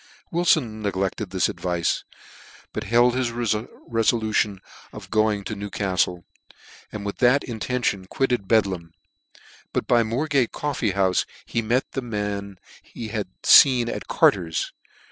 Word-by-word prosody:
Wilfon 155 -10 +2
neglected 95 0 -2
this 95 -1 +1
advice; 90 -2 -1 0.7
but - - -4
held 120 +1 +4
his 130 -2 0
re 120 +1 -3
folution 110 -1 0 0.3
of - - -11
going 110 -1 +2
to 110 - -5
Newcaftle, 95 -3 -1 0.7
and 105 -1 -6
with 100 - -4
that 125 +3 +4
in 115 -3 -6
tention 105 -6 -1
quitted 125 -4 -1
Bedlam, 95 -7 +1 0.8
but - - -1
by 120 -1 +4
Moorgate 130 +3 0
coffee 135 -8 -2
houfe 95 -1 +1 0.2
he 115 - -1
met 120 +4 0
the 135 - -3
men 105 -4 -4 0.2
he 115 - -8
had 105 -2 -3 0.2
icen 125 -4 +7
at - - -5
Carter's. 85 -4 +2
110 Hz, 135 wpm, -24 LUFS, 100-120 Hz, 0.8 s, icen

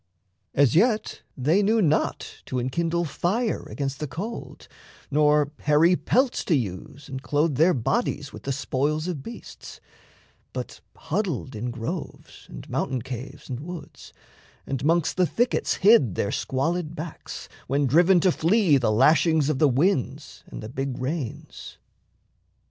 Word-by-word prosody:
As 140 -4 +4
yet 215 +4 +2 0.2
they 155 +10 +3
knew 220 +3 +3
not 155 -6 0
to 130 - -3
enkindle 165 +7 0
fire 205 - -1
Against 140 -1 -4
the 150 - -3
cold, 195 - -7 0.4
nor 150 0 +3
hairy 155 +4 +4
pelts 255 +7 +1
to 170 - +3
use 125 +4 -4
And 130 -2 -6
clothe 150 +2 +1
their 160 +7 +4
bodies 145 - -1
with - - -9
the 135 - -3
spoils 140 +4 -1
of 170 -6 -3
beasts; 230 - -10 0.7
But - - -6
huddled 160 - -3
in 115 +3 -3
groves, 120 +9 -7
and - - -10
mountain 130 -3 -2
caves, 130 +1 -8
and 125 -2 -5
woods, 175 +3 -9 0.5
And 135 -1 -3
'mongst 165 +3 +2
the 180 -1 +3
thickets 240 +7 0
hid 190 - +5
their 100 - -1
squalid 165 +5 -1
backs, 160 0 -7 0.2
When 140 +2 +1
driven 175 +7 +5
to 185 - +4
flee 170 -2 +3
the 115 -4 +1
lashings 150 +5 +4
of 145 -4 0
the 150 - +5
winds 140 0 0
And - - -8
the 110 - -6
big 135 0 -3
rains. 135 -1 -5
150 Hz, 145 wpm, -25 LUFS, 130-175 Hz, 0.7 s, hid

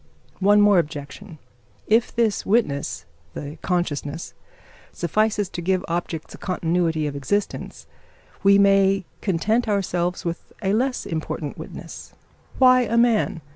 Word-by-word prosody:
One 205 +2 +5
more 205 -3 +6
objection: 155 +3 -6 0.5
if 225 +2 +2
this 230 -3 +1
witness 145 - 0 0.3
the 145 +2 -7
consciousness 165 -4 -2 0.6
suffices 210 +4 0
to 175 - -6
give 185 +1 0
objects 170 -1 -4
a - - -11
continuity 165 -3 0
of 145 -1 -3
existence, 200 +9 -3 0.6
we 200 0 +6
may 195 -1 +4 0.2
content 215 +6 +1
ourselves 180 -4 -1
with 170 0 -5
a 195 0 +1
less 250 +4 0
important 155 -2 -4
witness. - - -9 0.4
Why 255 -1 +6
a 235 -1 0
man? 230 -7 +2
190 Hz, 125 wpm, -23 LUFS, 165-210 Hz, 0.6 s, more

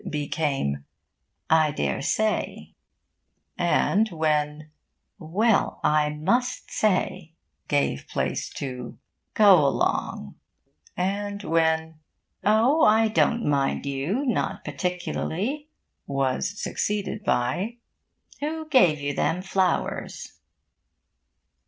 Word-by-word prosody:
became 140 - -2 0.7
'I 155 -2 +4
daresay,' 215 +9 -1 0.8
and 195 +4 +2
when 155 -2 -1 0.5
'Well, 200 +7 +1
I 150 0 +3
must 190 +12 -1
say' 185 -5 0 0.3
gave 145 - 0
place - - -2
to 125 -3 -6 0.4
'Go 195 -7 +7
along,' 135 - -1 0.6
and 200 +2 -2
when 160 -1 +1 0.4
'Oh, 225 - +4
I 220 +1 +5
don't 230 +2 +2
mind 140 -1 0
you 140 - -1
not 245 - -1
particularly' 190 - -3 0.4
was 135 +8 -1
succeeded 210 0 -2
by 175 - 0 0.6
'Who 315 +2 -4
gave 180 - +5
you 145 0 -2
them 180 +5 0
flowers?'... 190 -2 -2
175 Hz, 85 wpm, -25 LUFS, 150-215 Hz, 0.8 s, Go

